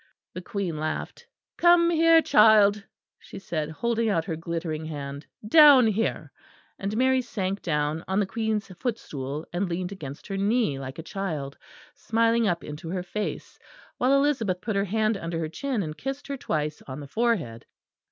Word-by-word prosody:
The 180 - -6
Queen 185 -4 -3
laughed. 155 0 -4 0.3
"Come 345 0 +5
here, 330 0 +5
child," 210 -1 +5 0.4
she - - -11
said, 160 -5 -3
holding 230 +6 -1
out 165 -6 0
her 165 - -3
glittering 165 -1 -4
hand, 145 -2 -6 0.2
"down 285 -1 +8
here," 220 +1 -1 0.5
and 200 +2 -3
Mary 260 +1 +3
sank 195 -5 -3
down 150 0 -1
on 190 +2 0
the 205 - +2
Queen's 220 0 -2
footstool, 150 - -4
and 180 +1 -1
leaned 180 +2 -3
against 145 -8 -8
her 195 - -4
knee 205 - +1
like 130 0 -7
a 165 - -6
child, 155 -8 -4 0.4
smiling 230 -4 +1
up 175 -3 -1
into 150 +2 -7
her 180 0 -3
face; 205 +4 -5 0.4
while 255 +2 +3
Elizabeth 275 -10 +1
put 215 +1 -3
her 200 0 +1
hand 215 +1 0
under 165 -2 -4
her 160 -1 -2
chin 230 - -2
and 155 -2 -5
kissed 270 +1 -5
her 280 - -4
twice 150 - -3
on 130 +1 -6
the 145 - -7
forehead. 170 - -1
195 Hz, 170 wpm, -26 LUFS, 160-230 Hz, 0.5 s, down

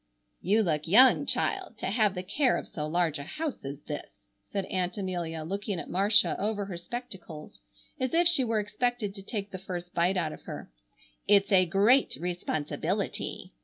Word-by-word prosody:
"You 210 +5 +3
look 155 -4 -1
young, 250 +9 +6
child, 370 - -1
to - - -5
have 210 -1 +2
the 180 - -4
care 255 +7 +2
of - - -6
so 150 -1 -4
large 165 -2 +1
a - - -5
house 300 - -5
as 140 +1 -6
this," - - -8 0.2
said 195 -2 -2
Aunt 180 0 -2
Amelia, 175 -5 -3
looking 200 +2 -3
at - - -7
Marcia 205 +4 +3
over 205 0 -1
her 195 -2 -6
spectacles 180 -6 -8 0.4
as 260 0 -1
if 345 +1 +5
she 320 -6 +5
were 225 -3 +1
expected 215 0 -1
to 195 - -9
take 200 0 -5
the 190 - -6
first 180 -1 -6
bite 175 +3 +2
out 160 -4 -1
of - - -11
her. - - -8 0.6
"It's 200 0 +4
a 185 -2 +5
great 210 +9 +4
responsibility!" 175 - -3
195 Hz, 180 wpm, -29 LUFS, 175-220 Hz, 0.6 s, young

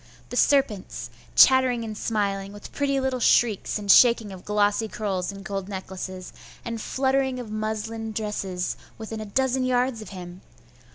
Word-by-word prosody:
The - - -6
serpents! 270 -9 +1 0.2
chattering 260 -3 +6
and 220 -1 -5
smiling, 200 -2 -2
with 205 - -10
pretty 275 -1 0
little 265 -1 -1
shrieks 225 -3 +3
and 205 -1 +2
shaking 235 -3 +6
of 185 -1 -10
glossy 210 +1 +1
curls 200 -4 -2
and 195 0 -10
gold 195 -1 -4
necklaces, 185 -1 -6 0.3
and 230 -1 -4
fluttering 265 0 0
of 230 -4 -7
muslin 220 +1 -3
dresses, 200 -4 -3 0.2
within 220 0 -6
a 215 - -5
dozen 260 +4 +1
yards 250 -2 +1
of 215 - -9
him! 180 -1 -9
215 Hz, 155 wpm, -25 LUFS, 200-250 Hz, 0.3 s, chattering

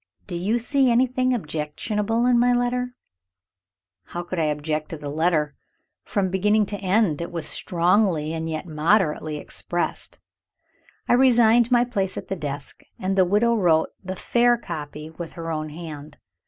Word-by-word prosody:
"Do 180 - -6
you 195 +7 0
see 265 +2 +2
anything 255 +1 +2
objectionable 210 +5 -1
in 245 -1 +4
my 245 +1 +4
letter?" 250 0 -1 1.1
How 175 - -5
could 175 0 -4
I 160 - +2
object 150 +1 -2
to 165 - -5
the 145 -1 -6
letter? 155 -1 +1 0.5
From 195 -4 -1
beginning 210 +3 +3
to 205 - -4
end, 190 -5 +1
it 170 - -5
was 165 -3 -3
strongly, 175 -3 +1
and 165 0 -3
yet 155 +2 -4
moderately, 155 -1 +1
expressed. 175 +3 -4 0.9
I - - +3
resigned 240 -2 +5
my 240 -1 +4
place 195 -6 -2
at - - -7
the 195 - -1
desk, 145 -4 -6 0.2
and 190 +1 -1
the 190 -1 +5
widow 210 +6 +3
wrote 170 -7 +3
the 185 0 -4
fair 240 +5 +3
copy, 150 -6 -7
with 165 0 -8
her 165 -1 -5
own 155 -1 -3
hand. 150 -2 -9
185 Hz, 160 wpm, -24 LUFS, 155-230 Hz, 1.1 s, resigned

